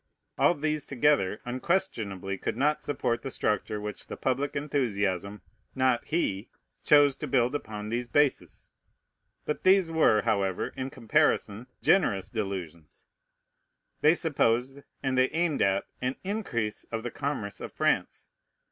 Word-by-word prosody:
All 175 - +4
these 150 0 -1
together 140 -7 +1
unquestionably 115 - -1
could 95 - -4
not 150 +3 +1
support 120 -4 -1
the 135 - -5
structure 105 -3 -1
which 105 0 -7
the - - -7
public 135 +2 -1
enthusiasm, 105 - -1 0.3
not 130 -2 +2
he, 115 - -1 0.3
chose 145 -2 +5
to - - -5
build 125 0 +2
upon 105 -7 -5
these 120 +2 -2
bases. 145 +2 0 0.7
But 150 - -2
these 185 -3 +4
were, 130 -10 +4
however, 100 -5 0
in 130 0 -5
comparison, 115 -2 +1 0.2
generous 115 - +2
delusions. 90 -7 -5 1.0
They 155 +3 +5
supposed, 135 -5 0 0.2
and 130 -1 +1
they 130 - +4
aimed 165 -2 0
at, 95 0 +2 0.2
an 125 +1 -1
increase 160 - -3
of 115 -1 -5
the 120 - -4
commerce 135 -8 -4
of - - -6
France. - - -1
125 Hz, 135 wpm, -28 LUFS, 105-145 Hz, 1.0 s, chose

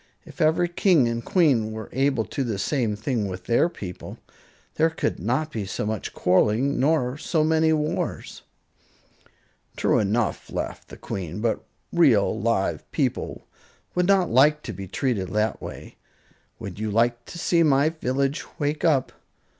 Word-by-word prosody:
"If - - -10
every 160 +3 +3
king 175 - +3
and 115 0 -2
queen 130 - +2
were 110 -1 -6
able 135 -3 +1
to 135 - -3
do 120 - -4
the 105 - -2
same 115 -1 0
thing 110 0 -2
with 90 -1 -6
their 120 - +2
people, 90 - -8 0.6
there 160 +1 +3
could 160 - -2
not 130 - -1
be 110 - -3
so 100 - -3
much 110 -1 -3
quarreling 110 +9 +2
nor 140 -1 +1
so 160 -1 +1
many 160 0 +3
wars." 155 -1 -2 1.3
"True - - +2
enough," 105 -4 -1
laughed - - -5
the - - -11
Queen; 90 -1 -5
"but 115 0 -1 0.3
real, 135 -13 +4
live 110 -3 -1
people - - -2 0.5
would 180 0 +1
not 195 -3 +3
like 150 +5 +4
to 115 - -5
be 95 +1 -7
treated 105 -2 -1
that 105 0 0
way. - - -9 0.6
Would - - -8
you 110 0 -2
like 120 +3 +1
to - - -9
see 170 0 +2
my 145 -1 +4
village 140 -2 -1 0.2
wake 150 0 -1
up?" 145 -6 +2
130 Hz, 160 wpm, -24 LUFS, 110-155 Hz, 1.3 s, real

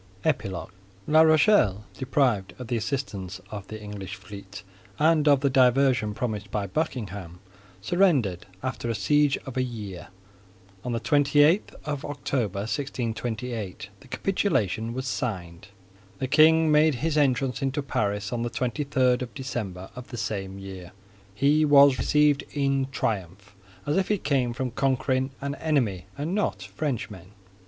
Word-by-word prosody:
EPILOGUE 95 -2 -1 0.3
La 155 +1 +5
Rochelle, 155 - +4
deprived 125 -7 0
of 125 - -7
the 120 - 0
assistance 110 -6 -3
of 105 -2 -7
the 110 - -7
English 105 -1 -7
fleet 100 -1 -10 0.3
and 155 0 +3
of 140 -2 +5
the 140 - +3
diversion 125 -4 +3
promised 105 -4 -3
by 105 -2 -2
Buckingham, 100 - -4 0.4
surrendered 130 - +2 0.2
after 130 -2 -3
a 115 - 0
siege 145 +5 +3
of 135 -2 -7
a - - +3
year. 105 -8 -6 0.8
On 125 - -3
the 115 - -1
twenty 145 +1 +4
eighth 170 +8 +2
of 145 -2 -3
October, 125 -8 -2
1628, 115 -3 -4
the - - -17
capitulation 115 - 0
was 130 0 -3
signed. 95 -8 -4 0.5
The 130 - -2
king 155 +2 +5
made 150 -1 +4
his 155 +5 -1
entrance 135 -4 +1
into 135 +1 -1
Paris 105 -4 -1
on 120 - -1
the 120 - -1
twenty 125 +4 -2
third 130 -3 +2
of 125 -2 -5
December 105 -9 -5
of 125 0 -9
the 120 - -7
same 100 -3 -3
year. 95 -2 -9 0.4
He 145 +7 +3
was 140 -2 +6
received 150 -1 +3
in 135 -1 +1
triumph, 100 -5 -3 0.3
as 145 - 0
if 190 - +1
he 210 - +1
came 135 -7 0
from 125 0 -3
conquering 130 0 0
an 140 0 -2
enemy 130 - -1
and 150 +5 -2
not 195 - -1
Frenchmen. 105 - -5
125 Hz, 150 wpm, -26 LUFS, 105-145 Hz, 0.8 s, was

